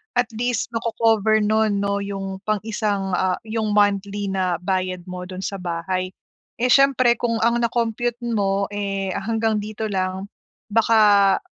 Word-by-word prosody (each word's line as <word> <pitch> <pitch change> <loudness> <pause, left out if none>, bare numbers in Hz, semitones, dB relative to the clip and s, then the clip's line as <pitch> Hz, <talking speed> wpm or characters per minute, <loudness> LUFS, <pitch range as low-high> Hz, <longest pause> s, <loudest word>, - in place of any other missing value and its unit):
At 245 -1 +2
least, 240 +1 -1
mako-cover 225 -2 +2
no'n 215 -1 +2
'no, 200 0 0
yung 195 -1 -5
pang 215 -2 0
isang, 205 -3 -2
ah, 185 -1 +1
yung 220 -1 -2
monthly 200 0 +1
na 185 -2 0
bayad 185 -1 -1
mo 180 0 -6
do'n 185 0 -7
sa 195 - -3
bahay. 185 +1 -3 0.4
Eh, 250 +2 +1
siyempre 265 -3 +5
kung 230 -1 0
ang 235 +1 +3
na-compute 235 0 -1 0.2
mo, 200 -1 +1
eh, 195 -2 -2
hanggang 220 0 -1
dito 215 +1 -5
lang, 190 -1 -2 0.5
baka 210 -3 +5
205 Hz, 145 wpm, -22 LUFS, 195-225 Hz, 0.5 s, siyempre